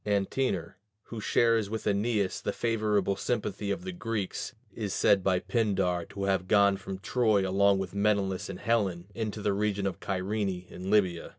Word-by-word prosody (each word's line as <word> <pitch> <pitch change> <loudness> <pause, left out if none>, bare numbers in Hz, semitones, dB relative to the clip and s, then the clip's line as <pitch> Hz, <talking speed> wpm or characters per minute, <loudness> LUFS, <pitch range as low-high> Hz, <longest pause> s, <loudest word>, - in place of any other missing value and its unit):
Antenor, 100 -1 -1 0.3
who 115 -2 -6
shares 115 -2 +2
with 110 +1 -4
Æneas 105 -1 0
the - - -1
favorable 105 -4 0
sympathy 105 -2 -2
of 165 - -2
the 185 - -4
Greeks, 115 - -4 0.2
is 105 -5 -3
said 95 -2 +4
by 95 -1 +3
Pindar 90 -6 0
to 100 -1 -5
have 95 -2 0
gone 100 0 +5
from 95 0 -6
Troy 105 0 +2
along 100 +1 +4
with 95 -1 -4
Menelaus 100 -2 0
and 95 - -7
Helen 100 -7 0
into 110 -2 -4
the 100 - +2
region 100 -1 0
of 95 -3 -2
Cyrene 95 -1 -2
in 95 +1 -7
Libya. 95 -5 +2
100 Hz, 170 wpm, -29 LUFS, 95-110 Hz, 0.3 s, gone